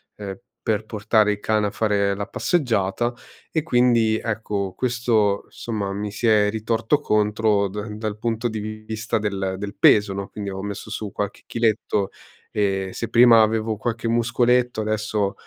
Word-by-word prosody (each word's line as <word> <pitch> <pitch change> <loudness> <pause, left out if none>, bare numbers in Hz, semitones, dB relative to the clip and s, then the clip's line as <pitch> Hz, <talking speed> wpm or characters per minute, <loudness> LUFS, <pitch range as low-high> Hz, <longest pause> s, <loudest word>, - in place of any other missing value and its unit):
ehm, 100 0 -7 0.2
per 110 -1 -1
portare 110 -1 +2
il 105 - -3
cane 110 -1 +1
a - - -4
fare 100 -2 +1
la 100 +1 -4
passeggiata. 120 - 0 0.4
E 160 - 0
quindi 120 -6 +3
ecco, 105 -4 -3
questo 115 -5 +1
insomma, 105 -4 -4
mi 105 0 -4
si 115 +3 -1
è 105 -1 +4
ritorto 115 +5 0
contro 105 -3 +2
da 105 +3 -5
dal 105 0 -5
punto 115 +1 -1
di 110 -1 -4
vista 110 +1 -3
del 95 -3 -2
del 100 0 -6
peso 105 -1 +5
no, 100 0 -4
quindi 100 -2 -5
ho 95 0 -5
messo 100 +1 -6
su 105 -2 -4
qualche 100 -1 -4
chiletto 110 -3 0 0.4
e 95 -2 0
se 115 - -4
prima 115 -1 +7
avevo 110 0 +1
qualche 115 +1 -3
muscoletto 120 0 +2
adesso 110 -2 -1
110 Hz, 160 wpm, -23 LUFS, 100-115 Hz, 0.4 s, prima